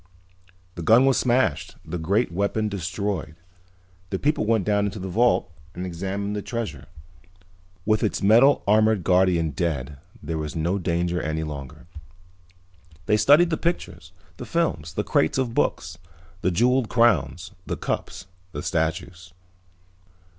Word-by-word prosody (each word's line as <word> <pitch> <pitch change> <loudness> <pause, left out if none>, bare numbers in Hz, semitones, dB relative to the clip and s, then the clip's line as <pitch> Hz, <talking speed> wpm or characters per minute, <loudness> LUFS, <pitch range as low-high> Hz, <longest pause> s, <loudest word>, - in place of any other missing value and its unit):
The 85 - -7
gun 115 +9 +5
was 135 -1 +3
smashed, 95 - 0
the 85 +2 -5
great 100 +6 0
weapon 100 +4 -1
destroyed. 95 -3 -3 0.7
The 95 - -2
people 145 -2 0
went 110 -4 +2
down 105 -1 +2
into 100 - -6
the 95 - -5
vault 110 -1 +2 0.2
and 90 +1 -4
examined 95 +4 -4
the 105 - -3
treasure. 115 -3 -5 1.0
With 110 0 +2
its 110 - -1
metal 120 +8 +5
armored 110 -1 +3
guardian 90 -3 +2
dead 70 -3 -3 0.2
there 80 -1 -3
was 75 -1 -5
no 85 +5 0
danger 85 0 -1
any 80 0 -2
longer. 70 -4 -8 1.2
They 105 - +3
studied 145 +10 +5
the 160 - 0
pictures, 90 - -3 0.3
the - - -7
films, 100 - -1
the - - -1
crates 80 - +1
of 130 -3 -1
books, 85 -3 -1 0.4
the - - +1
jeweled 120 +6 +2
crowns, 110 -6 +2 0.2
the - - -3
cups, 90 0 -4 0.3
the 75 - -5
statues. 85 +1 -3
95 Hz, 140 wpm, -24 LUFS, 85-110 Hz, 1.2 s, gun